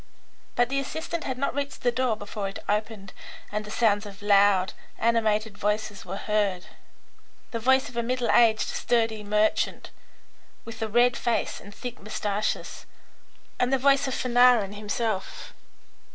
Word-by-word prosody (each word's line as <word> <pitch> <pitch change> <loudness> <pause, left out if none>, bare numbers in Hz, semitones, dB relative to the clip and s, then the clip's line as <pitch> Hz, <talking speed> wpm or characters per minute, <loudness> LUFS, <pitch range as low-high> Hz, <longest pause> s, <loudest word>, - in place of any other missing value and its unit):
But 245 0 +2
the 275 +1 0
assistant 320 +4 -4
had 260 -2 -3
not 280 - -1
reached 280 0 -4
the 245 - +3
door 245 -1 0
before 205 -1 -5
it 195 - -8
opened 210 -2 -2 0.4
and 210 +1 -2
the 210 - -10
sounds 210 -2 +1
of 200 0 -12
loud, 200 -2 +4 0.2
animated 220 -2 +1
voices 210 0 -2
were 190 +2 -5
heard; 205 -4 0 0.9
the 230 - -3
voice 265 +3 +3
of 245 - -12
a 235 - +1
middle 245 0 0
aged, 220 -3 +4
sturdy 225 -3 0
merchant, 210 +1 0 0.7
with 230 0 -9
a 220 - 0
red 240 +3 +3
face 235 -1 -1
and 200 - -12
thick 245 0 -7
moustaches, 210 0 -3 0.7
and 250 +1 +1
the 270 - +4
voice 275 +1 +3
of 265 - -2
Fanarin 245 -5 +4
himself. 210 -1 -3
220 Hz, 150 wpm, -26 LUFS, 205-245 Hz, 0.9 s, loud